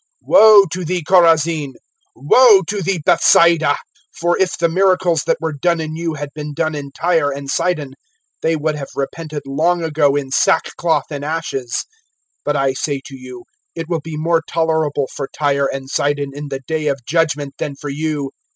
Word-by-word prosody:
(21)Woe 215 Hz, -6 st, +7 dB
to 185 Hz, +1 st, -4 dB
thee, 175 Hz, 0 st, -2 dB
Chorazin! 165 Hz, -5 st, +3 dB, 0.4 s
Woe 200 Hz, -, +5 dB
to 200 Hz, +3 st, -3 dB
thee, 180 Hz, -3 st, -2 dB
Bethsaida! 165 Hz, -3 st, +4 dB, 0.3 s
For 175 Hz, +1 st, 0 dB
if 190 Hz, -1 st, 0 dB
the 170 Hz, -, +2 dB
miracles, 180 Hz, -2 st, +1 dB
that -, -, +1 dB
were 160 Hz, -1 st, -3 dB
done 170 Hz, +4 st, 0 dB
in 155 Hz, 0 st, -4 dB
you, 165 Hz, -1 st, -3 dB
had 145 Hz, -1 st, -6 dB
been 150 Hz, -1 st, -7 dB
done 160 Hz, 0 st, -1 dB
in 140 Hz, -2 st, -6 dB
Tyre 165 Hz, -1 st, +1 dB
and 140 Hz, 0 st, -5 dB
Sidon, 155 Hz, -7 st, -1 dB, 0.5 s
they 165 Hz, 0 st, +1 dB
would 155 Hz, 0 st, -1 dB
have 140 Hz, -2 st, -6 dB
repented 150 Hz, +1 st, -5 dB
long 165 Hz, +5 st, 0 dB
ago 150 Hz, -3 st, +1 dB
in 140 Hz, -2 st, -3 dB
sackcloth 160 Hz, +1 st, +1 dB
and 145 Hz, -1 st, -5 dB
ashes. 145 Hz, -5 st, -3 dB, 0.6 s
(22)But 145 Hz, -, +1 dB
I 135 Hz, -1 st, +1 dB
say 140 Hz, +1 st, -2 dB
to 135 Hz, -, -10 dB
you, 125 Hz, -2 st, -11 dB, 0.3 s
it 165 Hz, -1 st, -6 dB
will 165 Hz, -3 st, -1 dB
be 155 Hz, 0 st, -7 dB
more 165 Hz, +1 st, +1 dB
tolerable 160 Hz, -4 st, 0 dB
for 140 Hz, -2 st, -5 dB
Tyre 140 Hz, -2 st, +1 dB
and 135 Hz, -1 st, -6 dB
Sidon 145 Hz, 0 st, -1 dB
in 145 Hz, +1 st, -7 dB
the 135 Hz, -1 st, -5 dB
day 155 Hz, 0 st, -2 dB
of 140 Hz, -4 st, -2 dB
judgment, 150 Hz, -2 st, -1 dB
than 140 Hz, -, -4 dB
for 145 Hz, +1 st, -7 dB
you. 145 Hz, -2 st, -3 dB
155 Hz, 180 wpm, -18 LUFS, 140-170 Hz, 0.6 s, 21)Woe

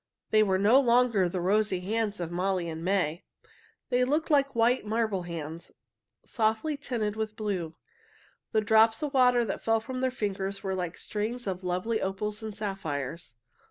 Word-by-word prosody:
They 215 Hz, -, +5 dB
were 190 Hz, -3 st, +3 dB
no 215 Hz, +7 st, +5 dB
longer 235 Hz, -7 st, +3 dB
the 180 Hz, -, -3 dB
rosy 195 Hz, +1 st, +1 dB
hands 210 Hz, +1 st, -1 dB
of 170 Hz, -1 st, -4 dB
Molly 180 Hz, 0 st, -1 dB
and 160 Hz, 0 st, -5 dB
May. 180 Hz, -3 st, 0 dB, 0.7 s
They 250 Hz, -1 st, +3 dB
looked 300 Hz, +5 st, 0 dB
like 275 Hz, -2 st, +3 dB
white 235 Hz, +2 st, +3 dB
marble 215 Hz, -2 st, 0 dB
hands, 165 Hz, -1 st, -7 dB, 0.5 s
softly 225 Hz, +6 st, 0 dB
tinted 235 Hz, -7 st, -3 dB
with 215 Hz, -1 st, -3 dB
blue. 190 Hz, -7 st, -3 dB, 0.8 s
The 220 Hz, -, +2 dB
drops 220 Hz, +3 st, +4 dB
of 295 Hz, -1 st, -2 dB
water 250 Hz, -2 st, +4 dB
that 195 Hz, -, -4 dB
fell 225 Hz, 0 st, +3 dB
from 255 Hz, +3 st, -5 dB
their 260 Hz, -, +2 dB
fingers 195 Hz, -4 st, -3 dB
were 190 Hz, -1 st, -1 dB
like 180 Hz, -2 st, -3 dB
strings 225 Hz, +4 st, -3 dB
of 190 Hz, -1 st, -3 dB
lovely 185 Hz, +5 st, -1 dB
opals 210 Hz, +3 st, -3 dB
and 220 Hz, -2 st, -6 dB
sapphires. 165 Hz, -, -4 dB
210 Hz, 165 wpm, -28 LUFS, 185-230 Hz, 0.8 s, They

